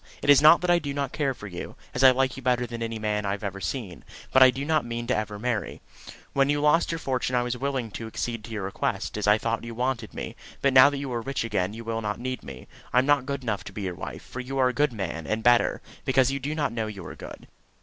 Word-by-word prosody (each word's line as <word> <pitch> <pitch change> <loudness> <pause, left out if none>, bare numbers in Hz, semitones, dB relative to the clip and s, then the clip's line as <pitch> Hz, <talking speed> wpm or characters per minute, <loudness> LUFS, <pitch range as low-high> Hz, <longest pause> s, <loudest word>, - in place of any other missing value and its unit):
It 145 - +6
is 140 - +7
not 155 +3 +8
that 180 -1 +2
I 175 - +5
do 140 -3 -5
not 140 -2 -2
care 140 -4 -1
for 105 - -10
you, 90 -4 -7 0.2
as 125 - 0
I 130 - +10
like 130 0 +1
you 135 - -8
better 125 -1 +1
than 120 -1 -7
any 115 0 -3
man 105 -1 -1
I 100 -1 -1
have 100 - -6
ever 100 -1 -4
seen; 105 -10 -4 0.3
but 130 - +5
I 130 - +10
do 135 +3 -3
not 155 -1 +2
mean 120 0 -4
ever 105 -3 -1
to - - -8
marry. 120 -1 -2 0.5
When 140 0 +3
you 145 0 +2
lost 150 +4 +3
your 165 - -2
fortune 130 -4 -1
I 120 - +2
was 120 0 -2
willing 130 -3 -2
to 110 +4 -6
accede 115 0 -4
to - - -11
your 105 -3 -3
request, 95 - -2
as 105 -1 -2
I 105 +1 +6
thought 115 +1 -2
you 115 -1 -7
wanted 125 -2 -2
me; - - -5 0.2
but 140 -1 +2
now 130 +2 +9
that 145 - -4
you 135 -2 -4
are 120 - -1
rich 135 +1 -2
again 105 -4 -1
you 115 - -7
will 115 0 -3
not 105 -1 -3
need 130 +1 -4
me. 65 -2 -10 0.2
I - - +1
am 130 - +5
not 145 -2 +3
good 140 -1 -3
enough 110 -4 -2
to - - -7
be 100 - -5
your 95 -2 -2
wife, - - -7
for 130 - -8
you 130 +2 -4
are 130 -1 +4
a - - -3
good 145 +2 +2
man; 90 -7 -4
and 110 +1 -1
better, 120 0 +3 0.2
because 130 -1 +3
you 140 - -2
do 145 +3 -3
not 145 -6 -1
know 110 -2 -2
you 100 -5 -8
are - - -7
good. - - -10
125 Hz, 290 wpm, -26 LUFS, 110-135 Hz, 0.5 s, I